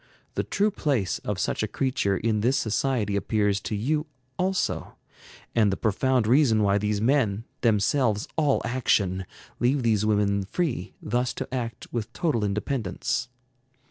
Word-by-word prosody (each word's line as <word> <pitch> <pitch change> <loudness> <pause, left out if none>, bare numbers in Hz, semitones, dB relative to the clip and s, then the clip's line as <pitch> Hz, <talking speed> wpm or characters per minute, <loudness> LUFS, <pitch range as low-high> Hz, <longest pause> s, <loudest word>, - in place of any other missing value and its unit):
The - - 0
true 210 +1 +1
place 140 - 0
of - - -3
such - - -1
a - - 0
creature 110 -7 0
in 110 +1 0
this 130 +5 +2
society 110 -2 0
appears 100 0 +1
to 105 - -3
you 150 +9 0 0.3
also, 190 +1 -1 0.6
and 110 -4 +3
the 95 - -1
profound 120 +3 +1
reason 115 -3 +4
why 100 0 +3
these 105 0 0
men, 115 -3 +2 0.2
themselves 110 0 +2
all 150 -4 +2
action, 100 -7 +1 0.3
leave 130 +2 +2
these 110 -3 +2
women 100 -2 +2
free 120 - -2
thus 125 +3 0
to - - -5
act 120 -3 -4
with 115 -2 -3
total 150 - 0
independence. 105 +2 -2
115 Hz, 145 wpm, -26 LUFS, 105-130 Hz, 0.6 s, reason